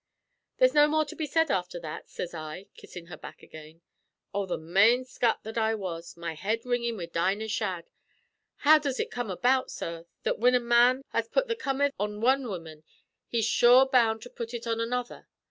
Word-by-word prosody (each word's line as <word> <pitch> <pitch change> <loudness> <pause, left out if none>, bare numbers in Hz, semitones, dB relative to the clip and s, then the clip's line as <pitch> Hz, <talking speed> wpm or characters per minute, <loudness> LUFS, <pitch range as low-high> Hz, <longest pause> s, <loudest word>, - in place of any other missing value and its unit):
"'There's - - +4
no 295 0 +6
more 310 +1 +1
to 290 - -9
be 315 - -3
said 325 +1 +1
afther 180 -1 -2
that,' 155 -2 -8
sez 175 - -6
I, 155 +3 -7
kissin' 175 -2 -11
her 175 - -10
back - - -12
again. 155 +1 -13 0.5
Oh, 200 -1 -2
the 180 - -2
mane 200 +10 +3
scut 240 -2 0
that 220 +1 -4
I 220 0 +1
was, 170 -5 -6
my 170 -1 -4
head 215 +8 -2
ringin' 235 -2 -1
wid 170 -2 -7
Dinah 195 +6 0
Shadd! 190 -6 -3 0.7
How 310 +1 +8
does 280 -3 -3
ut - - -2
come 245 -3 -4
about, 255 +8 +1
sorr, 165 0 -6 0.2
that - - 0
whin 250 +2 +4
a - - +4
man 240 +2 +3
has 230 -1 -1
put - - 0
the 460 - -1
comether 280 -7 0
on 210 +1 -3
wan 260 +3 +2
woman 165 -6 -8 0.4
he's 230 -3 0
sure 245 +3 +6
bound 230 -4 +2
to 245 - -11
put 235 +1 -6
ut 235 0 -6
on 230 -1 -1
another? 245 +1 -3
225 Hz, 200 wpm, -28 LUFS, 180-250 Hz, 0.7 s, How